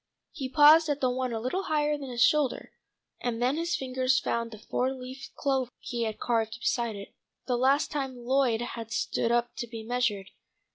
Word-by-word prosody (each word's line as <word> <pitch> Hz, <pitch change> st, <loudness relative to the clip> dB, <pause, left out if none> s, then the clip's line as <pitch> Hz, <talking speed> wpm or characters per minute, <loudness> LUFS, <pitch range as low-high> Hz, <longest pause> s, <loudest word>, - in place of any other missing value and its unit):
He 275 Hz, -6 st, -5 dB
paused 300 Hz, +4 st, +7 dB
at 290 Hz, -1 st, 0 dB
the 255 Hz, -2 st, +2 dB
one 255 Hz, 0 st, -2 dB
a 225 Hz, -, -2 dB
little 310 Hz, -, -2 dB
higher 300 Hz, -1 st, +1 dB
than 280 Hz, -2 st, -7 dB
his 240 Hz, 0 st, +2 dB
shoulder, 295 Hz, -3 st, +2 dB, 0.5 s
and 235 Hz, -2 st, -2 dB
then 250 Hz, +3 st, +2 dB
his 340 Hz, +2 st, -1 dB
fingers 260 Hz, 0 st, +1 dB
found 235 Hz, -3 st, -1 dB
the 220 Hz, -, -10 dB
four 250 Hz, +4 st, -1 dB
leaf 260 Hz, +1 st, -8 dB
clover 265 Hz, -3 st, 0 dB
he 235 Hz, -1 st, -3 dB
had 220 Hz, -1 st, -4 dB
carved 225 Hz, -1 st, 0 dB
beside 235 Hz, -2 st, 0 dB
it, 200 Hz, 0 st, -9 dB, 0.3 s
the 250 Hz, -, 0 dB
last 270 Hz, +4 st, +2 dB
time 270 Hz, -4 st, -3 dB
Lloyd 245 Hz, -1 st, +1 dB
had 230 Hz, -2 st, -6 dB
stood 230 Hz, +1 st, 0 dB
up 240 Hz, 0 st, +1 dB
to 240 Hz, -, -4 dB
be 225 Hz, -1 st, -7 dB
measured. 225 Hz, -5 st, -1 dB
250 Hz, 195 wpm, -28 LUFS, 235-275 Hz, 0.5 s, paused